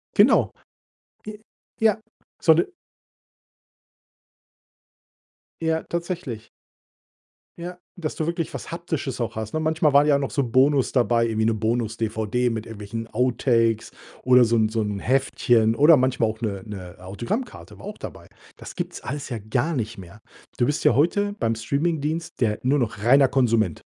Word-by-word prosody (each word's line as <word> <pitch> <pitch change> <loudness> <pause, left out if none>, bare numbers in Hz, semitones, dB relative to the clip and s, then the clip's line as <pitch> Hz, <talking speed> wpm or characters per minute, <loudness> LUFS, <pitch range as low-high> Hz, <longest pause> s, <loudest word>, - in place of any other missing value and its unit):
Genau. - - +5 0.8
J 215 0 -7 0.4
ja. 220 -2 +4 0.4
So 160 - +6
'ne 170 - +3 3.0
Ja, 160 0 0
tatsächlich. 170 - -5 1.1
Ja, 180 +1 -7 0.2
dass 160 -4 -4
du 155 - -2
wirklich 170 -1 -3
was - - -7
Haptisches 160 -6 -4
auch 115 - -3
hast, 110 +2 -5
ne? 155 - +1
Manchmal 155 -1 +2
waren 140 +1 +5
ja 145 -2 +3
noch 135 - -2
so 140 - 0
Bonus 130 +3 +3
dabei, 120 -2 +2
irgendwie 110 -1 0
'ne 115 - +1
Bonus-DVD 110 +1 -1
mit 110 0 -5
irgendwelchen 110 +1 -6
Outtakes 115 -2 +1 0.3
oder 125 -1 +6
so 115 - +1
'n 110 -1 +2
so 110 0 -1
'n 105 -1 -3
Heftchen 120 -2 +2
oder 150 +5 +6
manchmal 125 -3 +1
auch 110 - -6
'ne 100 -4 -3
'ne 95 -4 -8
Autogrammkarte, 120 - -5
war - - -11
auch - - -7
dabei. - - -9 0.3
Das - - -10
gibt's - - -5
alles 140 -1 -5
ja 120 - -4
gar 120 +10 -1
nicht 115 -3 -3
mehr. 95 +3 -12 0.4
Du 120 - +3
bist 145 - -1
ja - - +5
heute 205 - +2
beim 115 -3 0
Streamingdienst 155 +7 -2
der 105 -3 +1
nur 135 +3 +2
noch 115 -5 -2
reiner 135 +4 +6
Konsument. 115 - +2
125 Hz, 155 wpm, -23 LUFS, 110-150 Hz, 3.0 s, So